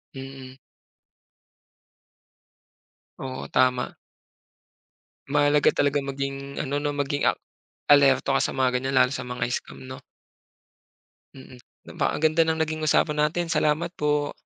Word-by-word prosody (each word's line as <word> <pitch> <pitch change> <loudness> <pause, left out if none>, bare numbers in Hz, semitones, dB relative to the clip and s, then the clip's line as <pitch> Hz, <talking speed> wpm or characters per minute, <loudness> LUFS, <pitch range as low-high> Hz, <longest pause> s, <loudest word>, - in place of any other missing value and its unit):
Mm. 135 -1 -9 2.6
Oo, 130 -1 -6
tama. 125 -1 +1 1.3
Mahalaga 145 +1 +3
talaga 145 0 +1
maging 140 0 -5
ano 140 +1 -2
'no, 145 0 -2
maging 145 0 -1
a - - +4 0.6
alerto 140 -1 +5
ka - - 0
sa - - -1
mga 130 -1 +1
ganyan 130 +1 -2
lalo 125 0 +5
sa 125 - -5
mga 125 -1 -3
scam - - -5
'no. 130 0 -9 1.4
Mm. 130 -1 -13 0.3
Napakaganda 155 +1 +1
ng 160 0 0
naging 155 0 -4
usapan 150 0 +2
natin, 170 +1 -3
salamat 155 +3 +1
po. 150 0 0
140 Hz, 115 wpm, -25 LUFS, 130-150 Hz, 2.6 s, alerto